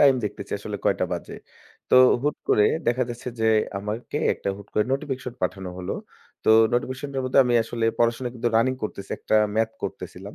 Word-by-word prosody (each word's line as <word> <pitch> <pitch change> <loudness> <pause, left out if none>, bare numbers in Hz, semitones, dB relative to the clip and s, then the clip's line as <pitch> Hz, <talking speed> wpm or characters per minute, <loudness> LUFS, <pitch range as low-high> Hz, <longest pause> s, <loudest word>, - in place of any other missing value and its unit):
Time 140 -2 +7
দেখতেছি 105 - -5
আসলে - - -5
কয়টা - - +2
বাজে। - - -5 0.6
তো - - +5 0.3
হুট 150 +1 0
করে 105 - +5 0.2
দেখা 120 +2 +2
যাচ্ছে 120 +1 -6
যে 110 - +2 0.3
আমাকে 105 +7 -5 0.2
একটা - - -5
হুট 100 - -12
করে 105 - +3
notification 135 -3 -3
পাঠানো 95 -2 -2
হলো। 90 - -4 0.5
তো - - +4 0.2
notificationটার 130 +2 -2
মধ্যে 130 +2 +5
আমি 120 -1 +1
আসলে 115 0 -3
পড়াশোনা 120 +1 +1
কিন্তু 120 0 0
রানিং 130 +3 +3
করতেছি, 100 -2 -5
একটা 110 - +1 0.2
ম্যাথ 110 0 +1
করতেছিলাম। - - -7
120 Hz, 175 wpm, -24 LUFS, 110-130 Hz, 0.6 s, Time